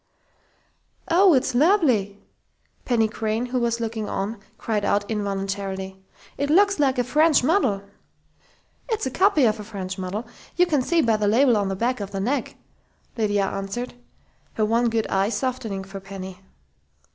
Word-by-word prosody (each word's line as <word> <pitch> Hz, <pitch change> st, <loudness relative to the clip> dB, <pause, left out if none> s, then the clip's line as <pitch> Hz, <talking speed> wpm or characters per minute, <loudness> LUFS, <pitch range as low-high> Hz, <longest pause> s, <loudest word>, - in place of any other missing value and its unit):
"Oh, 360 Hz, -1 st, +6 dB
it's 255 Hz, -, +1 dB
lovely!" 250 Hz, -, +3 dB, 0.7 s
Penny 230 Hz, -3 st, +2 dB
Crain, 220 Hz, +1 st, -2 dB
who 250 Hz, 0 st, -1 dB
was 235 Hz, -1 st, 0 dB
looking 220 Hz, -2 st, -3 dB
on, 200 Hz, +3 st, -3 dB, 0.2 s
cried 215 Hz, -2 st, -2 dB
out 205 Hz, 0 st, +1 dB
involuntarily. 195 Hz, -2 st, -3 dB, 0.4 s
"It 285 Hz, -, 0 dB
looks 395 Hz, +3 st, +4 dB
like 270 Hz, -2 st, +2 dB
a 245 Hz, -, +2 dB
French 300 Hz, +3 st, +3 dB
model." 255 Hz, -, +2 dB, 1.1 s
"It's 445 Hz, -, -1 dB
a 260 Hz, -, -2 dB
copy 370 Hz, -4 st, +3 dB
of 215 Hz, -1 st, +1 dB
a -, -, -6 dB
French 190 Hz, -3 st, -6 dB
model. 190 Hz, +5 st, -4 dB, 0.3 s
You 355 Hz, -, +4 dB
can 305 Hz, -6 st, +1 dB
see 335 Hz, +5 st, +2 dB
by 225 Hz, -2 st, +2 dB
the 210 Hz, -1 st, 0 dB
label 240 Hz, +3 st, +4 dB
on 205 Hz, -2 st, +1 dB
the 195 Hz, -, -2 dB
back 240 Hz, +5 st, -1 dB
of 200 Hz, -1 st, -5 dB
the 195 Hz, -1 st, -4 dB
neck," 255 Hz, +9 st, -2 dB, 0.6 s
Lydia 205 Hz, -3 st, +1 dB
answered, 195 Hz, +6 st, -4 dB, 0.6 s
her 215 Hz, -, +1 dB
one 230 Hz, +2 st, +2 dB
good 225 Hz, -1 st, 0 dB
eye 195 Hz, +1 st, +1 dB
softening 235 Hz, -6 st, -3 dB
for 195 Hz, +1 st, -8 dB
Penny. 190 Hz, -1 st, -9 dB
225 Hz, 160 wpm, -23 LUFS, 200-260 Hz, 1.1 s, Oh